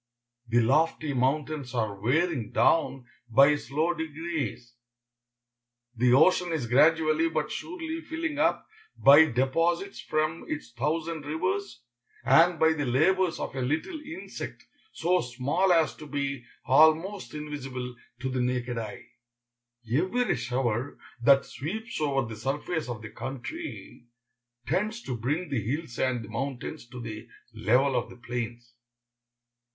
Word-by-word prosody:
The 120 +1 +3
lofty 150 +4 +2
mountains 135 0 -1
are 110 -3 0
wearing 125 - 0
down 135 -6 +2 0.2
by 140 +5 +6
slow 155 +4 -1
degrees. 160 -6 -4 1.2
The 120 +2 +3
ocean 175 +5 +4
is 155 -7 -1
gradually, 155 +5 +4
but 155 -2 -2
surely, 330 -1 -5
filling 320 -2 -4
up, 325 +2 +2 0.3
by 145 +4 +8
deposits 165 +9 0
from 155 +1 -1
its 145 -6 -5
thousand 155 +5 -2
rivers, 185 -3 -2 0.4
and 165 +6 +5
by 160 0 +4
the 145 -3 -2
labors 175 +8 +2
of - - -4
a 130 - -2
little 155 - -2
insect 325 +5 -8 0.3
so 180 +2 +1
small 130 +10 0
as 165 -3 +3
to 155 - -10
be 140 -3 -3 0.2
almost 160 +8 +3
invisible 135 -4 -5 0.3
to 130 - -2
the 130 -1 -1
naked 125 -1 -1
eye. 110 -2 -7 0.8
Every 185 - +1
shower 125 +1 -2 0.2
that 135 +3 +5
sweeps 220 - -5
over 135 -4 +1
the 110 -1 -8
surface 145 +4 -2
of 115 -3 -5
the 110 - -8
country 135 - -7 0.6
tends 215 +4 -1
to 130 - -3
bring 145 +10 -2
the 135 -6 -1
hills 125 +3 -4
and 125 -3 0
the - - -13
mountains 130 0 -5
to 125 0 -9
the 110 -2 -7 0.3
level 125 +5 +2
of - - -1
the - - -12
plains. 120 -1 -5
145 Hz, 135 wpm, -28 LUFS, 125-165 Hz, 1.2 s, by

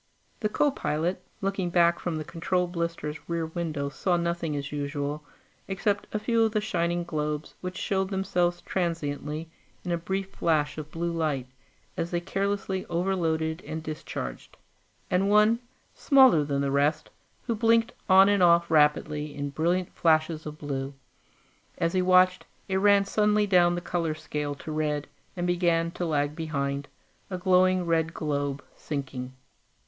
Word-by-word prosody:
The 215 - 0
co 290 +6 +2
pilot, 170 - -2 0.2
looking 195 -2 -1
back 170 0 +3
from 175 -2 -3
the 155 - -3
control 180 +3 -1
blister's 170 -3 -3
rear 170 -1 -1
window, 160 -3 -3
saw 175 +5 0
nothing, 170 -2 -1
as 140 0 -4
usual, 145 0 -3 0.4
except 200 +1 -1
a - - -1
few 230 +2 +1
of 220 -1 +2
the 215 - +2
shining 175 -4 -1
globes, 150 -2 -3
which 185 0 -5
showed 190 -1 0
themselves 180 -3 0
transiently 155 -3 -2 0.4
in 180 - -2
a 170 - 0
brief 190 +3 -3
flash 155 -4 0
of 155 0 -7
blue 170 +2 -2
light 155 -6 -1 0.5
as 170 - -2
they 175 - 0
carelessly 195 +1 -2
overloaded 165 -2 0
and 160 0 -5
discharged 150 - -6 0.5
and 190 +2 +2
one, 210 +2 +5 0.3
smaller 260 - +5
than 140 -1 -1
the 140 -1 0
rest, 150 +3 +1 0.3
who 235 - -1
blinked 230 +1 +3 0.2
on 190 +1 +8
and 205 -1 +3
off 170 -1 +5
rapidly 150 -1 +2
in 145 0 -3
brilliant 175 +4 0
flashes 155 -1 +2
of 150 0 -7
blue. 140 -2 -4 0.8
As 165 0 0
he 185 - +2
watched, 185 0 +4 0.2
it 190 -1 0
ran 200 0 +5
suddenly 210 +1 +2
down 175 -3 +4
the 175 - -3
color 165 -3 -1
scale 150 -2 -4
to 155 - -8
red 150 -1 -1 0.3
and 175 - -1
began 170 -2 +1
to 175 0 -3
lag 145 -1 0
behind, 140 -3 -2 0.4
a 185 - -3
glowing 185 0 +3
red 165 -1 0
globe, 145 -2 -2
sinking. 130 -3 -5
170 Hz, 155 wpm, -27 LUFS, 150-185 Hz, 0.8 s, on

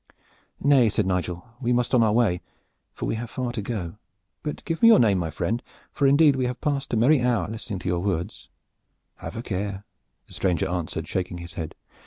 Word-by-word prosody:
"Nay," 135 -5 +5
said 105 -1 0
Nigel, 90 -2 -2
"we 125 -2 0
must 125 +1 +1
on 125 - +5
our 110 -2 +4
way, 105 -6 +2 0.5
for - - -5
we - - -1
have 115 +1 -4
far 125 0 -3
to 120 - -3
go. 100 -4 -4 0.4
But 150 - -5
give 165 -2 -3
me 230 - +8
your 230 - +9
name, 105 -6 +4
my 85 -2 -2
friend, 95 +9 -2 0.3
for 140 - +2
indeed 145 +1 +5
we 130 -1 0
have 125 0 -4
passed 140 -2 -1
a - - +1
merry 130 +5 +4
hour 120 -7 +1
listening 110 -1 -5
to 95 - -6
your 90 -1 +1
words." 90 +1 -3 0.7
"Have - - -7
a 115 - -4
care!" 100 -1 -3 0.4
the - - -15
stranger 90 -4 0
answered, 90 -3 -3
shaking 90 -1 -2
his 85 0 -8
head. 80 -2 -5
110 Hz, 210 wpm, -25 LUFS, 90-125 Hz, 0.7 s, your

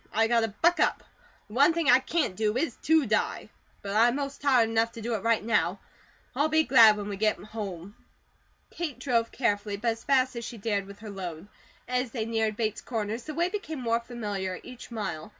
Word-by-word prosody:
I 225 +1 +3
got 235 +1 +3
to 225 - +1
buck 335 +12 +1
up. - - +1 0.4
The 210 - -14
one 285 +7 +5
thing 330 -3 -1
I 255 -2 +7
CAN'T 265 - -1
do 215 +3 0
is 270 -3 -1
to 320 -2 +3
die; 215 -2 -1 0.3
but 200 0 -4
I'm 235 +3 +4
most 280 -1 -4
tired 255 -5 +4
enough 225 0 +1
to 230 - -8
do 235 +2 -2
it 215 - -2
right 230 -1 +1
now. 225 -2 +1 0.6
I'll 290 +4 +2
be 315 0 +3
glad 225 -7 +7
when 205 -1 -5
we 200 -1 -4
get 215 +1 +1
home." 200 -3 -7 0.8
Kate 315 -7 -4
drove 240 -3 0
carefully, 205 -4 -1
but 230 +3 0
as 225 0 -7
fast 260 -2 +2
as 235 - -5
she 230 - -7
dared 200 -2 -2
with 200 0 -11
her 215 -2 -7
load. 180 -2 -7 0.4
As 250 0 -1
they 225 -2 -3
neared 220 -1 -1
Bates 220 -2 -1
Corners, 225 0 -4
the 310 - -6
way 340 +2 +2
became 365 -7 -5
more 230 -2 +1
familiar 205 -6 -4
each 250 -1 -11
mile. 210 -8 -5
230 Hz, 215 wpm, -27 LUFS, 210-255 Hz, 0.8 s, I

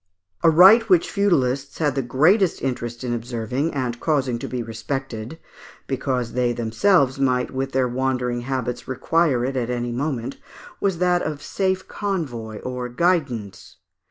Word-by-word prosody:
A - - +6
right 190 +8 +8
which 175 -3 +4
feudalists 140 -9 +1
had 150 -4 +1
the 135 - 0
greatest 160 - +2
interest 120 -2 -3
in 120 -1 -2
observing, 120 +5 -2
and 125 -3 -2
causing 135 -6 0
to - - -5
be 125 -2 -3
respected, 115 +3 -5 0.5
because 130 -3 -2
they 125 -1 +1
themselves 130 - +2
might 125 -2 +1
with 135 0 -3
their 130 -1 +2
wandering 125 -1 -1
habits 125 -1 -3
require 130 -1 +1
it 135 +1 -3
at 125 -2 -1
any 120 -1 -2
moment, 130 -1 -3 0.4
was 195 -3 0
that 180 0 +2
of 150 -2 -4
safe 190 +3 -1
convoy, 135 - -4
or 125 -1 -4
guidance. 125 - -1
130 Hz, 150 wpm, -22 LUFS, 120-155 Hz, 0.5 s, right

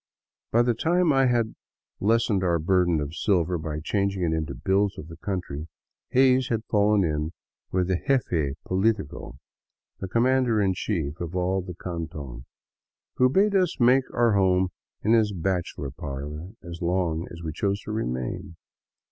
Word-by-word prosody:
By 120 +1 +4
the 120 0 +2
time 170 +6 +2
I 135 -1 +4
had 120 -2 +1 0.5
lessened 110 -2 +2
our 85 -2 +2
burden 90 0 +2
of 75 +1 -4
silver 90 -4 +1
by 75 -1 -4
changing 100 +1 0
it 80 -2 +1
into 80 -1 -3
bills 95 +1 +1
of 80 - -8
the 80 - -9
country. 80 -5 -4 0.4
Hays 130 0 +4
had 115 -1 -2
fallen 105 -1 +3
in 75 0 -1 0.4
with 90 -1 +1
the 95 -2 0
jefe 80 - +1
politico, 95 -4 -1 0.6
the 95 - -4
commander 120 +1 +2
in 95 -2 +2
chief 85 -7 -3
of 85 +1 -4
all 95 +1 +1
the 90 -1 -8
canton, 80 -9 -6 0.7
who 125 0 +5
bade 200 +9 +3
us 185 -4 +1
make 130 +2 +4
our 120 -2 +3
home 95 -2 +3 0.3
in 110 - +3
his 110 -3 +3
bachelor 90 -6 -2
parlor 75 +5 -6
as 85 0 -8
long 85 -2 0
as 85 0 -10
we 80 - -3
chose 100 +4 -1
to - - -7
remain. 90 - -3
95 Hz, 160 wpm, -26 LUFS, 80-110 Hz, 0.7 s, who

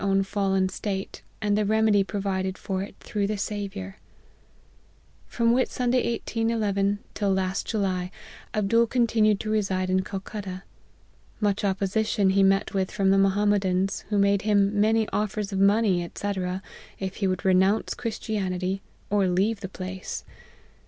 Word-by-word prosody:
own 195 0 +2
fallen 195 -1 +1
state, 195 +1 -4 0.2
and 205 -1 +2
the 210 - +2
remedy 215 -1 +3
provided 190 -1 -2
for 190 -1 -3
it 200 - -7
through 205 -3 -2
the 210 0 -2
Saviour. 200 -1 -4 1.3
"From 235 0 +2
Whit 255 +1 +2
Sunday 250 -1 +1
1811, 215 -4 0 0.2
till 200 -2 0
last 190 0 -1
July, 185 -4 -1 0.4
Abdool 230 +3 +2
continued 225 -4 +2
to 215 - -3
reside 190 -3 0
in 185 0 +2
Calcutta. 195 -1 -6 0.8
Much 205 -1 0
opposition 200 +1 +1
he 195 +1 +3
met 195 +2 +3
with 190 -1 0
from 195 -1 +1
the 195 - +4
Mohammedans, 195 -1 +2
who 210 - +1
made 200 0 +3
him 205 -1 +2
many 220 0 +3
offers 210 -1 -2
of 190 - -1
money, 195 -3 +3
&c., 205 0 -2 0.6
if 190 -1 -5
he 195 - 0
would 185 +2 -2
re 190 - +5
nounce 190 +4 +2
Christianity, 195 -5 -2 0.3
or 200 -2 +3
leave 195 +5 +1
the 195 -2 -6
place. 185 0 -6
200 Hz, 145 wpm, -26 LUFS, 190-215 Hz, 1.3 s, re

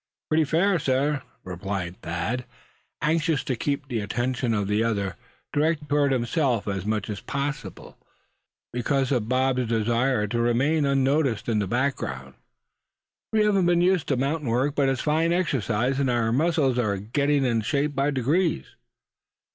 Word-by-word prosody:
"Pretty 155 0 +3
fairly, 175 +5 +2
sir," 140 +1 +1 0.2
replied 90 0 -5
Thad, 110 +9 -3 0.6
anxious 155 -2 +1
to 130 - -2
keep 140 +3 -2
the 120 -4 -2
attention 120 +4 -1
of 105 -3 0
the 105 +2 +1
other 100 -5 -1 0.4
directed 150 0 0
toward 145 -1 +2
himself 125 -2 0
as 95 -1 -3
much 110 -2 -1
as 105 -2 -4
possible, 140 +1 -5 0.7
because 130 +2 0
of 120 -5 0
Bob's 130 -1 +1
desire 115 +1 +1
to 115 +3 -1
remain 140 +6 +2
unnoticed 135 -4 +1
in 110 -3 +1
the 100 - -1
background. 90 - -2 1.0
"We 215 -1 +3
haven't 195 -4 +3
been 175 0 +3
used 180 -3 +2
to 135 - +1
mountain 140 +1 -1
work; 130 +5 +1
but 140 -2 +2
it's 135 -2 -1
fine 160 +2 +1
exercise, 135 - 0
and 135 -2 +1
our 115 -2 +1
muscles 140 -2 +2
are 105 -4 0
getting 140 +7 0
in 115 -3 +1
shape 145 +6 0
by 140 +1 +1
degrees." 145 - 0
130 Hz, 155 wpm, -25 LUFS, 115-145 Hz, 1.0 s, Pretty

